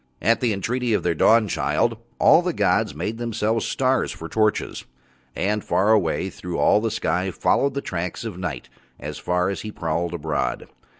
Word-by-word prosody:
At 115 +3 +2
the 120 -3 +2
entreaty 120 +4 -1
of - - -1
Their 85 - +1
Dawnchild 110 +4 +2 0.2
all - - +6
the - - -2
gods - - +1
made 105 +9 -4
Themselves 115 -1 -1
stars 130 0 +1
for 80 - -7
torches, 110 +3 0 0.5
and 105 +2 -1
far 100 +4 +2
away 95 -3 +1
through 90 0 -6
all 105 - +4
the 115 - 0
sky 95 -4 -1
followed 135 +9 +1
the 140 - -1
tracks 90 -2 -4
of 110 -5 -5
Night 85 -9 -5 0.3
as - - -6
far 90 +1 0
as 100 - -5
he 105 - -6
prowled 85 -1 -2
abroad. 80 -2 -2
100 Hz, 175 wpm, -23 LUFS, 85-115 Hz, 0.5 s, all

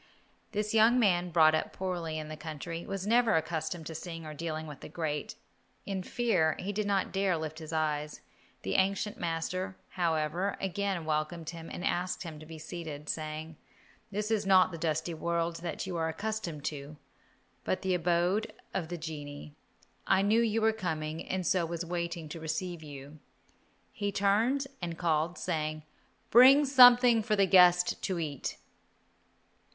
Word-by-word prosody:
This 210 0 -2
young 225 +3 +5
man, 180 -5 +3
brought 160 -2 +5
up 155 - -1
poorly 175 -4 -3
in 155 -1 -5
the 155 - -6
country, 165 +2 -6
was 195 -1 -4
never 230 +1 +4
accustomed 160 +1 -2
to 160 - -6
seeing 165 0 -7
or 155 - -6
dealing 160 0 -4
with 150 -3 -9
the - - -10
great. 155 -2 -3 0.5
In 195 -2 -3
fear, 180 -7 +1
he 200 +2 -4
did 210 0 -1
not 195 -2 +1
dare 195 -1 +1
to - - 0
lift 155 0 -5
his 160 -1 -8
eyes. 150 -1 -1 0.4
The 95 - -2
ancient 195 +2 0
master, 180 +3 -3
however, 170 +2 -1
again 195 -2 -2
welcomed 155 +1 -2
him 165 -1 -9
and 175 - -5
asked 180 +1 -1
him 160 -3 -8
to 155 - -12
be 160 0 -9
seated, 155 -2 -7
saying, 155 0 -4 0.5
"This 210 +2 -3
is 215 -2 +2
not 190 -2 +5
the 165 - -7
dusty 160 +1 -1
world 170 +1 -1
that 170 -1 -4
you 180 -2 -4
are 160 0 0
accustomed 175 -4 -4
to, 150 0 -5 0.7
but 185 - -1
the 190 -1 +1
abode 175 +4 +1 0.2
of 175 -4 -2
the 175 +1 -5
genii. 150 -2 -7 0.5
I 195 0 +4
knew 215 +3 +4
you 225 -1 +1
were 220 0 +4
coming, 160 -6 -3
and 185 -1 -1
so 180 +1 +2
was 170 +1 -3
waiting 170 -1 -3
to 165 - -7
receive 160 +2 -3
you." 145 0 -10 0.7
He 205 -5 -2
turned 220 +8 +2 0.2
and 170 -2 -4
called, 165 0 0
saying, 155 -1 -2 0.5
"Bring 265 +5 +8
something 245 -3 +7
for 215 0 +1
the 200 -1 +4
guest 180 -1 +5
to 185 - -1
eat." 150 -5 -4
170 Hz, 170 wpm, -30 LUFS, 155-195 Hz, 0.7 s, Bring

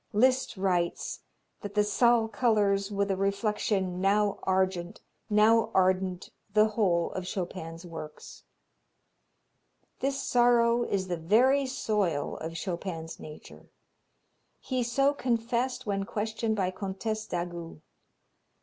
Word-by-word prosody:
Liszt 255 +1 +2
writes 180 -3 -1 0.4
that 205 0 -7
"the 210 - +4
Zal 230 +2 +3
colors 205 -3 +1
with 200 -1 0
a - - +1
reflection 195 -2 -1
now 200 +1 +2
argent, 185 -2 0 0.3
now 220 +2 +4
ardent 185 -1 +1 0.2
the 215 +1 +5
whole 185 -6 +1
of 185 -1 -5
Chopin's 175 -2 -5
works." 160 -3 -9 1.6
This 275 0 -1
sorrow 240 -1 +3
is 190 -1 -1
the 175 -1 -2
very 250 +11 +3
soil 205 - -1
of 165 +1 -6
Chopin's 170 -3 -5
nature. 155 0 -12 0.9
He 255 -2 -2
so 275 +4 +2
confessed 245 -1 -1
when 195 -2 -1
questioned 220 +2 -2
by 185 -3 0
Comtesse 210 +3 -4
d'Agoult. 175 -2 -5
200 Hz, 115 wpm, -28 LUFS, 185-225 Hz, 1.6 s, the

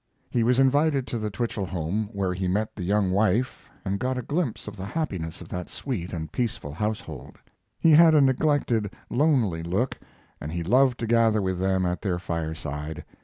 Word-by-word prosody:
He 120 - +1
was 120 +2 +3
invited 140 +1 +3
to 120 - -3
the 110 -1 -2
Twichell 105 -1 -3
home, 95 +5 -2
where 95 -4 -1
he 95 0 -2
met 105 +4 -1
the 100 - -6
young 100 +1 +1
wife 110 +6 +1 0.2
and 100 0 -1
got 130 0 -1
a 125 - -3
glimpse 145 -5 -2
of 105 - -6
the 95 - -7
happiness 95 - -3
of - - -10
that 90 -1 -5
sweet 105 -11 -4
and 80 -3 -5
peaceful 110 - -3
household. 90 - -4 0.4
He 165 - +4
had 160 +1 +7
a 150 - +6
neglected, 130 -5 +2 0.2
lonely 120 - +2
look, 95 +10 -1 0.4
and 75 - -5
he 85 +1 -3
loved 125 +6 +3
to - - 0
gather 115 -1 +3
with 95 -2 -1
them 95 0 +1
at 90 0 -1
their 95 -4 -1
fireside. 80 -3 -4
105 Hz, 190 wpm, -26 LUFS, 90-125 Hz, 0.4 s, had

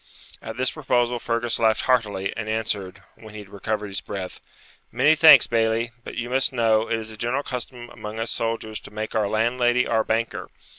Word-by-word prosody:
At 110 +1 -7
this 130 0 0
proposal 125 -5 0
Fergus 115 0 -1
laughed 110 -1 +3
heartily, 105 -6 0
and 110 -1 -5
answered, 105 -4 -3
when 110 -1 -14
he 105 - -7
had 100 - -14
recovered 105 +1 -3
his 95 -3 -5
breath 95 -3 -7 0.5
'Many 150 - +4
thanks, 155 0 +8
Bailie; 115 0 0
but - - -8
you 120 - -3
must 130 +1 +1
know, 115 -3 +2
it 115 - 0
is 110 0 -7
a 110 - -10
general 120 +6 -1
custom 125 -1 -6
among 110 -2 -8
us 115 - -2
soldiers 115 -1 -3
to - - -13
make 110 +1 -5
our 110 -2 +1
landlady 120 +3 +1
our 110 -1 +1
banker. 115 +1 -2
115 Hz, 195 wpm, -23 LUFS, 110-120 Hz, 0.5 s, thanks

